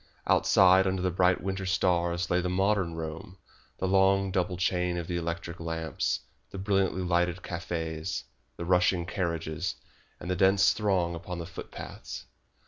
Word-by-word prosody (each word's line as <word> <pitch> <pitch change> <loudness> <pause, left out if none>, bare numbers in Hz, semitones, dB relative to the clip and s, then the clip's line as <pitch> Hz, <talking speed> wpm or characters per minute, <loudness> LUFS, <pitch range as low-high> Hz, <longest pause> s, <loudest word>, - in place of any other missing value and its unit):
Outside 95 0 +5
under 95 -1 -1
the 90 - +1
bright 90 +1 +3
winter 95 0 -3
stars 85 -2 +1
lay 90 0 +3
the 90 - -1
modern 95 -2 +1
Rome, 80 +3 -6 0.4
the 95 - -1
long, 95 0 +3
double 90 -1 0
chain 90 0 0
of 85 - -3
the 90 - -3
electric 85 0 -4
lamps, 80 -2 -2 0.3
the - - -8
brilliantly 95 -2 +1
lighted 90 0 +1
cafes, 80 -2 -4 0.3
the 85 - -4
rushing 90 0 +3
carriages, 85 0 -2 0.4
and - - -8
the 90 - 0
dense 95 +1 +4
throng 95 -5 +1
upon 85 +2 -6
the 85 - -5
footpaths. 90 - -8
90 Hz, 150 wpm, -29 LUFS, 85-95 Hz, 0.4 s, Outside